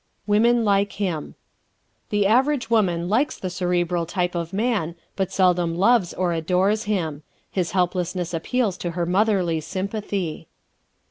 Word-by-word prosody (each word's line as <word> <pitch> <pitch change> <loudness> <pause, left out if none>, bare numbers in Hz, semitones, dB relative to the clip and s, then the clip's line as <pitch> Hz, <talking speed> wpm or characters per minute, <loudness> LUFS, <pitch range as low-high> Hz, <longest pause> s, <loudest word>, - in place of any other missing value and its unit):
Women 230 +3 +3
Like 200 0 +2
Him 180 -7 -3 0.7
¶ - - -42
The 205 -2 +1
average 250 +3 +2
woman 175 -6 +2
likes 245 +10 +1
the 185 - -4
Cerebral 175 -1 0
type 180 0 -1
of 170 -1 -3
man 200 -5 -1 0.2
but 190 -1 -1
seldom 180 -3 +2
loves 200 0 +3
or 180 -2 -1
adores 185 +6 +1
him. 165 -8 -2 0.3
His 180 -4 -1
helplessness 180 -1 -1
appeals 200 +4 0
to 175 - -3
her 170 - +1
motherly 185 -3 +2
sympathy. 190 -3 -4
185 Hz, 140 wpm, -23 LUFS, 175-210 Hz, 0.7 s, Women